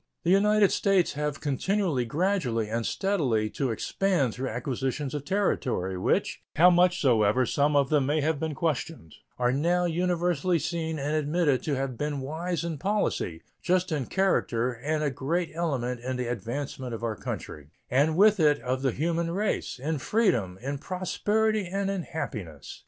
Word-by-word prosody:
The 175 - +2
United 210 +1 +4
States 195 -4 +2
have 150 0 -3
continued 150 - 0
gradually 145 - 0
and 115 +1 -1
steadily 130 - 0
to 135 -3 -1
expand 140 - 0
through 130 +1 -3
acquisitions 130 +3 -3
of 145 -1 -4
territory, 130 - 0
which, 90 - 0
how 175 +4 +7
much 180 +1 +4
soever 120 -2 +3
some 145 +4 +1
of 140 -2 +3
them 145 -3 +3
may 150 +2 +1
have 155 0 0
been 160 -1 -3
questioned, 155 - -3 0.2
are 125 0 +2
now 170 +6 +1
universally 175 0 +1
seen 160 0 -2
and 145 +2 -1
admitted 150 -2 +1
to 145 - 0
have 135 -3 -3
been 145 -2 -2
wise 160 +4 -3
in 165 -4 -4
policy, 190 - -1 0.2
just 180 0 +1
in 145 -5 -1
character, 130 -11 +1
and 150 +6 -2
a 145 - +1
great 165 +7 -2
element 135 -7 -2
in 130 +2 -3
the 125 0 -2
advancement 120 +2 -4
of 115 - -9
our 115 -2 -1
country, 75 -7 -6 0.2
and 145 +5 +3
with 210 +1 +5
it 150 -2 +4
of 130 +1 -2
the 135 -1 +1
human 165 +2 -1
race, 195 -3 -1
in 150 +3 -2
freedom, 130 - +1
in 140 +1 -3
prosperity, 205 +4 0
and 195 +2 -1
in 195 -2 -2
happiness. 105 - -6
150 Hz, 170 wpm, -27 LUFS, 125-175 Hz, 0.2 s, how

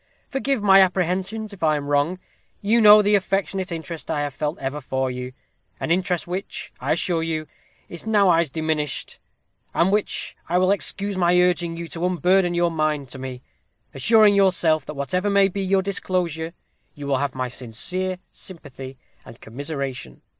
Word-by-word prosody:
Forgive 270 -4 -1
my 195 -1 +7
apprehensions 190 +4 0
if 195 - -13
I 155 -2 +3
am 145 -1 -3
wrong. 145 +5 +1 0.4
You 225 +3 +2
know 210 0 +9
the 205 +1 +2
affectionate 195 -1 0
interest 165 0 -6
I 145 - 0
have 145 -2 -3
ever 150 -1 -2
felt - - -22
for 130 0 -1
you 125 0 -6 0.5
an - - -2
interest 180 0 +1
which, 185 +3 -5
I - - 0
assure 170 -3 0
you, 160 -1 -2 0.4
is 175 +5 -10
nowise 185 -7 +4
diminished, 155 -1 -3 0.6
and 175 +3 +3
which 210 0 0
will 180 +2 +3
excuse 200 0 -2
my 175 0 +4
urging 175 -2 +1
you 170 0 -5
to 170 - -5
unburden 180 0 +2
your 175 0 +2
mind 155 -4 -1
to 130 - -8
me; 130 -1 -7 0.5
assuring 210 - +5
yourself, 180 -5 +3
that 150 - -6
whatever 180 +8 -1
may 200 -1 +5
be 195 +1 -4
your 190 0 +2
disclosure, 175 -4 -2 0.4
you 145 - -8
will 140 -1 +1
have 140 -1 -2
my 130 -1 -2
sincere 180 +11 -4
sympathy 135 -7 -9 0.3
and 115 - -13
commiseration. 135 - -6
175 Hz, 165 wpm, -23 LUFS, 145-190 Hz, 0.6 s, know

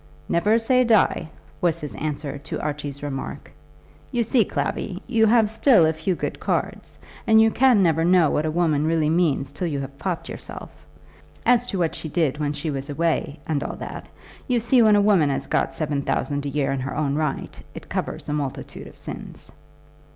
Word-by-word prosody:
"Never 210 +6 +3
say 250 +2 +3
die," 215 -8 +2 0.3
was 170 -2 +1
his 150 -3 -6
answer 145 -1 -4
to - - -5
Archie's 145 -1 -4
remark. 135 -2 -5 0.6
"You 240 -1 +1
see, 230 +1 +3
Clavvy, 190 -1 -3
you 225 -3 +3
have 225 -1 +4
still 220 - +4
a 160 - +2
few 160 +4 -1
good - - -4
cards, - - -3 0.3
and 220 0 +6
you 220 0 +5
can 245 -5 +4
never 165 -2 +2
know 175 -2 +4
what 155 +1 0
a - - 0
woman 155 -2 +1
really 160 -2 +2
means 150 -5 +1
till 175 +5 -3
you 145 -4 -2
have 140 0 -7
popped 180 -3 -3
yourself. - - -8 0.7
As 245 0 +4
to 195 - -3
what 170 -3 0
she 160 - -5
did 150 -3 0
when 145 -1 -1
she 150 +2 -3
was 135 +1 -5
away, 160 0 -1
and 150 -2 -1
all - - -5
that, - - -8 0.4
you 250 -3 +2
see 240 +2 +4
when 215 -2 +6
a 205 - +4
woman 195 -8 +4
has 135 0 -2
got - - 0
seven 145 -3 -2
thousand 145 0 -2
a - - -2
year 140 -1 0
in 135 - -1
her 135 +3 -4
own 145 -2 0
right, 150 -2 -3
it - - -9
covers - - -4
a 150 - -2
multitude 140 -3 -5
of - - -15
sins." - - -9
160 Hz, 200 wpm, -23 LUFS, 145-210 Hz, 0.7 s, and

